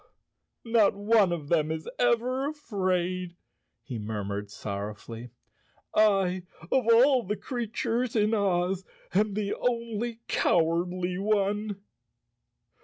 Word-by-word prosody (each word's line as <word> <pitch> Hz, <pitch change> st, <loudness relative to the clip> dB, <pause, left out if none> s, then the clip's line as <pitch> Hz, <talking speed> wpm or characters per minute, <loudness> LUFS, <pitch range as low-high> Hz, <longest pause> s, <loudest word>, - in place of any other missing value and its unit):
"Not 225 Hz, -4 st, +4 dB
one 205 Hz, -2 st, +3 dB
of 155 Hz, -4 st, -4 dB
them 155 Hz, -3 st, +2 dB
is 160 Hz, 0 st, -4 dB
ever 250 Hz, +3 st, +2 dB
afraid," 185 Hz, -, -2 dB, 0.5 s
he 125 Hz, -5 st, -5 dB
murmured 105 Hz, -1 st, -4 dB
sorrowfully. 105 Hz, +3 st, -6 dB, 0.6 s
"I, 195 Hz, -4 st, +3 dB, 0.3 s
of 260 Hz, -3 st, +2 dB
all 250 Hz, -1 st, +5 dB
creatures 240 Hz, 0 st, -2 dB
in 215 Hz, 0 st, +3 dB
Oz, 190 Hz, -2 st, +1 dB, 0.3 s
am 205 Hz, +1 st, +2 dB
the 205 Hz, -1 st, -1 dB
only 235 Hz, -1 st, -2 dB
cowardly 175 Hz, +2 st, +1 dB
one." 205 Hz, 0 st, 0 dB
200 Hz, 100 wpm, -28 LUFS, 175-230 Hz, 0.6 s, all